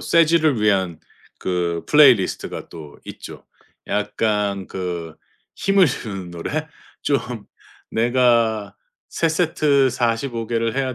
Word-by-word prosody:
쇠질을 160 -6 +3
위한 95 -6 +1 0.4
그 85 -2 -2
플레이리스트가 130 -10 +3
또 75 -3 -11
있죠. - - -10 0.4
약간 105 -1 -1
그 85 -4 -5 0.4
힘을 195 -2 +4
주는 100 -8 -5
노래. 145 - -4 0.4
좀 140 -2 +2 0.7
내가 115 -3 +2 0.3
3 165 - 0
세트 150 -5 +2
45 115 0 -1
개를 115 0 -1
해야 130 -2 -1
115 Hz, 185 characters per minute, -21 LUFS, 95-140 Hz, 0.7 s, 힘을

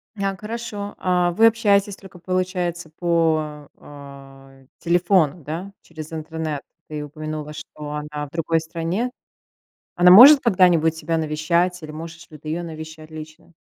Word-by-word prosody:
Няк, 195 -1 -3
хорошо. 210 -2 -6
А 180 -1 +1
вы 225 +6 +5
общаетесь 205 -3 +2
только, 190 -2 -15
получается, 180 -1 -2
по, 155 -3 -1
э, 135 -2 -14
телефону, 170 -3 +2
да, 170 +7 -6
через 155 -1 -10
интернет? 160 -2 -4 0.3
Ты 150 -1 -5
упомянула, 155 0 -6
что 150 -1 -9
она 150 0 -5
в - - -18
другой 165 0 0
стране. 170 +9 -3 0.8
Она 180 0 +6
может 265 +9 +10
когда-нибудь 180 -7 +3
тебя 165 +1 -2
навещать? 170 +3 0
Или 155 - -8
можешь 165 +2 -9
ли 155 - -12
ты 155 - -10
ее 165 +3 -2
навещать 160 -1 -9
лично? 155 +2 -11
165 Hz, 140 wpm, -22 LUFS, 155-180 Hz, 0.8 s, может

